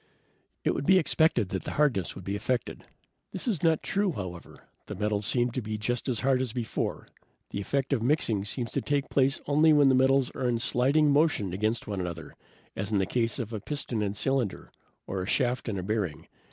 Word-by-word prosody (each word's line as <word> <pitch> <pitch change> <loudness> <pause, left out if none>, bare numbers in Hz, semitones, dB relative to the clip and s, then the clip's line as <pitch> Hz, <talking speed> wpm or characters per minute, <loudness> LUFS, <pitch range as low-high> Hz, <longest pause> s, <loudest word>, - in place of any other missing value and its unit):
"It - - +2
would 140 - -3
be 190 +1 +7
expected 160 - +2
that 95 - -3
the - - -5
hardness 130 - +1
would 95 - -9
be 100 +2 -3
affected. 125 +4 -3 0.5
This - - -4
is 200 -10 0
not 165 -2 +2
true, 200 -2 0
however. 90 -6 -8 0.2
The - - -5
metals 105 0 -1
seem 120 -1 +1
just 115 +1 -3
as 120 -4 0
hard 130 -1 +2
as 125 -4 -2
before. 120 -3 -3 0.4
The 100 - -3
effect 135 +7 -1
of 125 - +1
mixing 115 -6 +1
seems 115 +1 -3
to - - -1
take 145 -1 -1
place 135 0 +2
only 155 +2 +4
when 145 -2 +6
the - - +4
metals 130 0 +3
are 130 - -2
in 120 - +1
sliding 140 +6 +3
motion 140 - +2
against 110 +4 -1
one 100 -3 -3
another, 85 -2 -6 0.4
as 100 +2 -4
in 105 - +2
the 95 - +2
case 115 +1 0
of 120 -2 -5
a 110 - -3
piston 130 -5 -3
and 100 -1 -2
cylinder, 125 -2 -1 0.3
or 95 0 -3
a 90 - -4
shaft 125 0 0
and 100 - -2
a 90 - -3
bearing. 100 -5 -2
120 Hz, 205 wpm, -28 LUFS, 105-140 Hz, 0.5 s, be